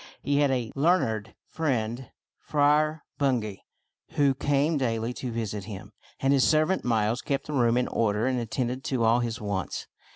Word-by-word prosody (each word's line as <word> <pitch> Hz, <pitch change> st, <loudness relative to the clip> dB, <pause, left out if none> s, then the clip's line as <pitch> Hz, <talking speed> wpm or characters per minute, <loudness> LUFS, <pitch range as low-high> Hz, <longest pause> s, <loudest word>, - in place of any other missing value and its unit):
He 140 Hz, 0 st, +1 dB
had 145 Hz, -1 st, +4 dB
a 125 Hz, -4 st, -1 dB
learned 135 Hz, -, +1 dB
friend, 125 Hz, -5 st, -2 dB, 0.3 s
Friar 150 Hz, +1 st, +2 dB, 0.2 s
Bungay, 120 Hz, -8 st, 0 dB, 0.5 s
who 140 Hz, -2 st, +3 dB
came 145 Hz, +4 st, +1 dB
daily 115 Hz, -2 st, -1 dB
to 125 Hz, 0 st, -5 dB
visit 105 Hz, -3 st, -4 dB
him; 105 Hz, -1 st, -8 dB, 0.3 s
and 135 Hz, +1 st, +3 dB
his 135 Hz, -2 st, +4 dB
servant 155 Hz, +4 st, +2 dB
Miles 115 Hz, 0 st, +1 dB
kept 140 Hz, -1 st, -2 dB
the 150 Hz, -, -5 dB
room 120 Hz, -3 st, +3 dB
in 125 Hz, -, +1 dB
order 105 Hz, 0 st, 0 dB
and 130 Hz, -1 st, +1 dB
attended 125 Hz, +2 st, -2 dB
to 130 Hz, -4 st, 0 dB
all 115 Hz, +2 st, +4 dB
his 115 Hz, -1 st, -2 dB
wants. 100 Hz, -3 st, -3 dB
125 Hz, 165 wpm, -27 LUFS, 110-140 Hz, 0.5 s, had